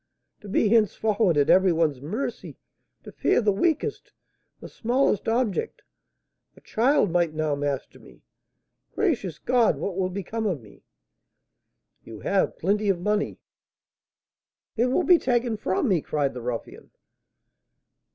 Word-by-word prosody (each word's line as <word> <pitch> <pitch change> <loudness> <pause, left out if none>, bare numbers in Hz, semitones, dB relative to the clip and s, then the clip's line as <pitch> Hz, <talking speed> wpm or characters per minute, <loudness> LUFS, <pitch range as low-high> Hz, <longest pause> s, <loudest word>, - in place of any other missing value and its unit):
"To 210 - -12
be 210 - +2
henceforward 215 -4 +2
at 145 0 +3
every 190 0 +5
one's 160 -5 0
mercy, 205 - -5 0.5
to - - -10
fear - - +1
the 210 -3 +2
weakest, 325 - -1 0.5
the - - -9
smallest 240 -2 0
object! 240 - -1 0.7
a - - -17
child 235 - +2
might 170 -2 +1
now 155 -1 0
master 140 -1 -3
me! - - -18 0.7
Gracious 230 - -1
God! 245 -3 +2
what 195 - -4
will 185 -1 -1
become 200 +4 -4
of 175 -8 -1
me?" 105 -4 -18 1.2
"You 110 -2 -11
have 195 -1 0
plenty 205 +4 0
of 190 -3 +1
money." 210 +3 -1 1.4
"It 235 +2 +2
will 260 +8 +1
be 350 -1 +5
taken 240 -2 0
from 210 +3 -1
me!" 185 -7 +2
cried 145 -2 -1
the 125 - -7
ruffian. 120 -1 -6
200 Hz, 135 wpm, -25 LUFS, 160-230 Hz, 1.4 s, every